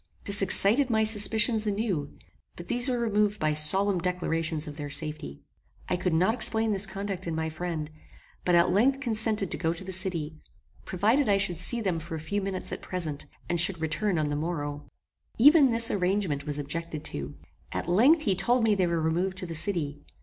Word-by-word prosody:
This 200 0 +5
excited 215 +7 +5
my 220 -1 +1
suspicions 220 +1 +2
anew; 200 -8 -3 0.4
but 175 - -11
these 245 +2 +1
were 250 - -1
removed 210 -3 0
by 155 0 0
solemn 190 +6 +2
declarations 165 -3 -2
of 150 - -8
their 145 -1 -7
safety. 145 - -5 0.5
I - - 0
could 180 0 -2
not 180 +7 +2
explain 225 -2 0
this 200 0 -1
conduct 195 -1 -6
in 165 - -3
my 160 0 -3
friend; 160 -1 -5 0.6
but 180 - +2
at 170 +1 +3
length 255 +8 +2
consented 220 -6 0
to - - 0
go 165 -1 -1
to 170 - -9
the 190 - -7
city, 170 -4 -1 0.5
provided 220 +8 +1
I 200 - +3
should 180 -4 0
see 235 +6 +5
them 185 -6 -2
for 160 0 -7
a - - -5
few 200 +7 -3
minutes 195 -1 -3
at - - -6
present, 160 -6 -5 0.2
and 175 - -1
should 170 0 +2
return 160 +5 -2
on 155 -1 -1
the 145 - -2
morrow. 145 -2 -5 0.5
Even 285 +3 +6
this 230 -1 +3
arrangement 180 -6 -2
was 145 -1 0
objected 155 +2 -5
to. 70 0 -6 0.4
At - - -5
length 260 - +3
he 200 - +1
told 235 +6 0
me 220 -2 +3
they 190 -3 0
were 170 -1 -1
removed 175 +4 -2
to 185 - -4
the 170 - -7
city. 155 -4 0
185 Hz, 200 wpm, -26 LUFS, 160-210 Hz, 0.6 s, Even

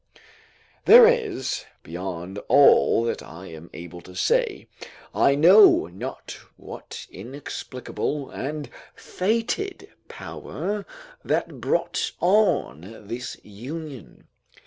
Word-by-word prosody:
There 475 0 +10
is, 460 - 0 0.2
beyond 90 +2 -6
all 140 -4 +5
that 115 - -2
I 85 +4 -11
am 80 +1 -11
able 85 +1 -10
to 90 - -14
say, 475 -4 0 0.5
I 140 - +3
know 185 +8 +7
not 100 +10 -8 0.2
what - - -9
inexplicable 130 +4 -5
and 145 +2 -5 0.2
fated 235 - -2 0.2
power 205 0 -6 0.4
that - - -2
brought - - -1
on 115 - +1
this 120 +3 -6
union. 130 - -9
135 Hz, 95 wpm, -24 LUFS, -, 0.5 s, There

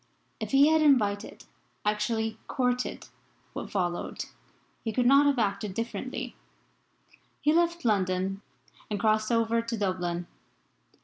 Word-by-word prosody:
If - - -4
he 280 +2 +6
had 315 0 +4
invited 215 -9 +2 0.4
actually 220 +1 0
courted 250 -1 -1 0.5
what - - -5
followed 175 -3 -2 0.6
he 225 - -1
could 245 +2 +1
not 275 +3 +6
have 280 -2 +2
acted 205 -2 -1
differently. 230 +1 -4 1.0
He 300 +1 +3
left 340 -2 +1
London 190 -2 +1 0.5
and 205 -1 -2
crossed 215 +1 +2
over 230 0 +2
to 230 0 -4
Dublin. 180 -3 -1
225 Hz, 120 wpm, -28 LUFS, 200-250 Hz, 1.0 s, he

